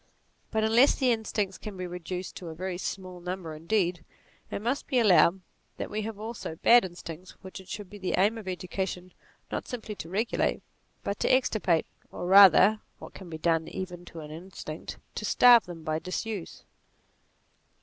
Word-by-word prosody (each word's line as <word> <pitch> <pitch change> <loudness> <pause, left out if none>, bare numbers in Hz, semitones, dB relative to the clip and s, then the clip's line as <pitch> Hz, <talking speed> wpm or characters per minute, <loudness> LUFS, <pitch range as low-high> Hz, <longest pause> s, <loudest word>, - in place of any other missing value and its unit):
But 220 0 0
unless 230 +5 +5
the 260 -3 +2
instincts 210 -4 -2
can 210 -3 -8
be 185 - -4
reduced 180 +1 -6
to 180 - -8
a 160 - -7
very 180 +1 -4
small 185 -2 -5
number 180 -2 -5
indeed, 170 +1 0 0.5
it - - -3
must 245 +7 -2
be 260 - 0
allowed 190 -4 +5 0.4
that - - -5
we 215 +1 -2
have 215 0 -5
also 220 -7 -6
bad 240 +8 +6
instincts 175 -1 -8
which 190 0 -8
it 190 - -18
should 205 -2 -6
be 205 +2 -11
the 190 - -1
aim 205 +4 +3
of 210 - -11
education 185 0 -4 0.4
not - - -3
simply 230 -4 -5
to 165 - -7
regulate 215 +6 0 0.4
but 200 - -3
to - - +2
extirpate, 215 -10 +2 0.3
or - - -6
rather 195 +2 +7 0.2
(what - - -11
can 185 -3 -10
be 160 - -6
done 165 0 +1
even 180 -2 -6
to 165 -2 -9
an 150 0 -9
instinct) 160 -1 -8 0.2
to - - -5
starve 240 0 +6
them 170 -2 -9
by 155 0 -1
disuse. 190 +2 -5
185 Hz, 180 wpm, -28 LUFS, 175-215 Hz, 0.5 s, rather